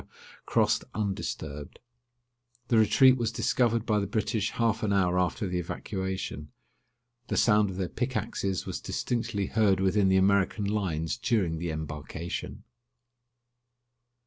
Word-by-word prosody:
crossed - - +2
undisturbed. 80 -8 -4 0.9
The 115 - +4
retreat 130 +4 +6
was 115 -2 -1
discovered 115 -1 +1
by 105 -1 +2
the 100 - -2
British 105 0 -1
half 115 -1 0
an 105 -3 0
hour 90 -2 +2
after 90 +4 0
the 90 0 -2
evacuation. 95 -4 -4 0.8
The - - -2
sound 105 -2 +4
of 95 - -6
their 95 -2 -1
pickaxes 105 -5 -2
was - - -5
distinctly 110 -4 -2
heard 100 -2 +2
within 95 +1 +2
the 95 0 +4
American 100 +1 +2
lines 90 -6 -1
during 90 -9 0
the 85 0 -3
embarkation. 80 +2 -5
100 Hz, 125 wpm, -28 LUFS, 90-110 Hz, 0.9 s, retreat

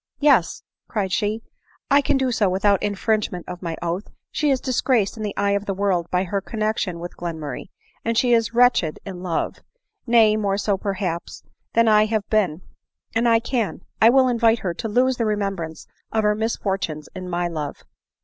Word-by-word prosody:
" - - -52
Yes," 275 - +3 0.2
cried 195 -4 -2
she, 215 +3 -1 0.2
" - - -28
I 285 +1 +6
can 280 0 +1
do 260 -1 +1
so 210 -4 +2
without 195 +1 +2
infringement 205 -3 -1
of 180 - -7
my 165 -3 -4
oath. 175 +4 -2 0.2
She 300 - 0
is 270 -2 +2
disgraced 250 -5 +1
in 220 - -8
the 210 -2 -4
eye 200 0 +2
of 200 0 -1
the 195 - -1
world 185 -4 0
by 180 0 +1
her 195 +2 -2
connexion 215 -3 -2
with 175 +1 -7
Glenmurray, 160 -6 -5 0.3
and 230 0 0
she 245 0 +4
is 230 -1 +2
wretched 240 -10 +3
in 185 -3 -7
love; 175 -3 -2 0.5
nay, 225 -2 +5
more 200 -2 0
so, 205 0 +1
perhaps, 190 -3 -4 0.3
than 230 0 +4
I 215 -1 +5
have 215 -2 -1
been; 185 -6 +1 0.5
and 235 +1 +2
I 230 0 +5
can, 235 -3 -2 0.2
I 225 - +8
will 260 +1 +5
invite 235 -2 +3
her 180 -3 -2
to 225 +6 -5
lose 250 +3 +2
the 230 - 0
remembrance 195 -6 -3 0.3
of 220 -1 +1
her 210 0 +3
misfor 215 -3 -1
tunes 155 -4 -5
in 185 -1 -7
my 175 0 -1
love 155 -4 -5
205 Hz, 195 wpm, -22 LUFS, 180-230 Hz, 0.5 s, I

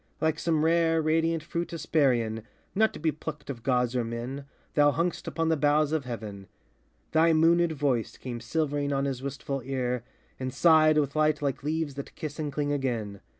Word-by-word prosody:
Like 160 -1 +1
some 160 -2 +1
rare, 165 0 +3
radiant 160 +1 +1
fruit 170 +1 -3
Hesperian, 130 -9 +1 0.3
Not 220 +2 +3
to - - -8
be 160 +1 +1
plucked 150 -1 -6
of 120 -4 -8
gods 125 -1 +1
or 125 - +1
men, 120 +4 -5 0.3
thou 145 -1 +5
hung'st 170 +4 -2
Upon 165 0 -1
the 160 - +3
boughs 150 0 +2
of 155 -4 -1
heaven. 105 -5 -6 0.6
Thy 165 +1 +4
moonéd 165 +1 +4
voice 135 -6 -1
Came 120 -2 -6
silvering 145 0 -1
on 140 0 0
his 135 -2 -3
wistful 140 0 -4
ear, 125 -2 -2 0.4
and 130 0 -3
sighed 155 +2 +5
With 145 -1 +1
light 155 -1 +2
like 140 -3 -1
leaves 155 0 -2
that 140 0 -8
kiss 155 0 -6
and 150 -2 -2
cling 145 +1 -1
again. 115 -8 -2
145 Hz, 185 wpm, -28 LUFS, 130-160 Hz, 0.6 s, thou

